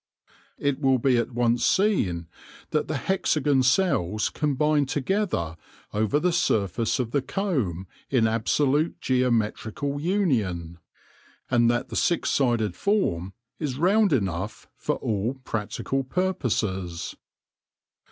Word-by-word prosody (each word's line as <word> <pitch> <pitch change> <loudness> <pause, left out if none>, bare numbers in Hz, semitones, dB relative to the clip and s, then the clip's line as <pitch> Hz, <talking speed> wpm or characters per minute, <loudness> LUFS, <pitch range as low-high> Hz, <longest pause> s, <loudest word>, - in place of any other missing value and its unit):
It 140 -1 0
will 135 -2 +3
be 125 0 +2
at 120 +1 -1
once 120 0 +1
seen 95 - +2 0.4
that 155 - 0
the 155 - -2
hexagon 150 -5 +1
cells 125 - +2
combine 150 0 +1
together 145 - -1 0.4
over 110 +7 +1
the 180 +3 +2
surface 110 - +1
of 120 -3 -2
the 140 - +1
comb 130 - -2 0.2
in 125 -4 +3
absolute 140 +7 +1
geometrical 125 +2 0
union, 110 - 0 0.7
and 120 -1 +4
that 120 +1 0
the - - -6
six 170 - +1
sided 115 -8 +1
form 95 - 0 0.3
is 140 -5 -3
round 195 +5 +3
enough 95 - -2
for - - -2
all 110 +4 -2
practical 120 +4 -2
purposes. 105 - -2
130 Hz, 115 wpm, -25 LUFS, 105-150 Hz, 0.7 s, and